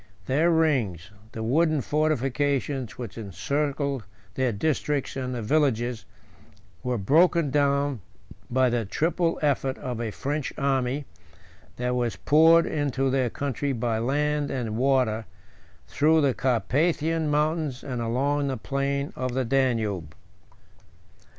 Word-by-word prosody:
Their 155 +6 +2
rings, 130 - +1 0.2
the 110 - -5
wooden 155 +5 +2
fortifications 140 -3 -1
which 115 -3 -7
encircled 140 - -2 0.3
their 130 -2 0
districts 145 +4 -1
and 130 -1 -3
villages, 120 -1 0 0.8
were 125 -1 -1
broken 160 - +3
down 140 -3 +1 0.5
by 130 0 +2
the 120 -1 0
triple 165 - 0
effort 135 -2 +1
of 125 -2 -4
a 115 - -2
French 145 +6 -3
army, 135 0 0 0.7
that 125 0 -1
was 120 -2 -1
poured 165 +2 +5
into 135 -3 0
their 130 -2 +1
country 140 +2 -2
by 115 -2 -1
land 145 +4 0
and 120 -5 -3
water, 125 -3 +1 0.6
through 155 +3 +3
the 140 -3 +3
Carpathian 155 - +1
mountains 150 -2 0
and 125 -4 -4
along 140 +5 0
the 135 -2 -2
plain 140 0 -2
of 130 -1 -3
the 130 -1 0
Danube. 115 - 0
135 Hz, 120 wpm, -26 LUFS, 120-150 Hz, 0.8 s, poured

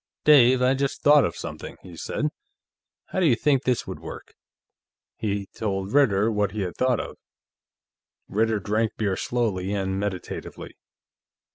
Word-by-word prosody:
"Dave, 130 -4 +6
I 130 +1 +4
just 135 0 -2
thought 145 -1 +7
of - - -3
something," - - -7
he 90 -2 -11
said. 130 - -2 0.8
"How - - -2
do 180 - +4
you 125 - +5
think 135 +1 +2
this 125 -2 +1
would - - -7
work?" - - -9 0.8
He 100 -3 -2
told 95 -2 -3
Ritter 115 -6 +4
what 105 -2 0
he 105 - -3
had 90 -2 -3
thought 130 -3 +1
of. - - -6 1.1
Ritter 110 +1 +1
drank 110 +3 0
beer 100 -3 0
slowly 100 -6 -1
and 95 -1 -1
meditatively. 100 -3 -5
110 Hz, 150 wpm, -25 LUFS, 100-130 Hz, 1.1 s, thought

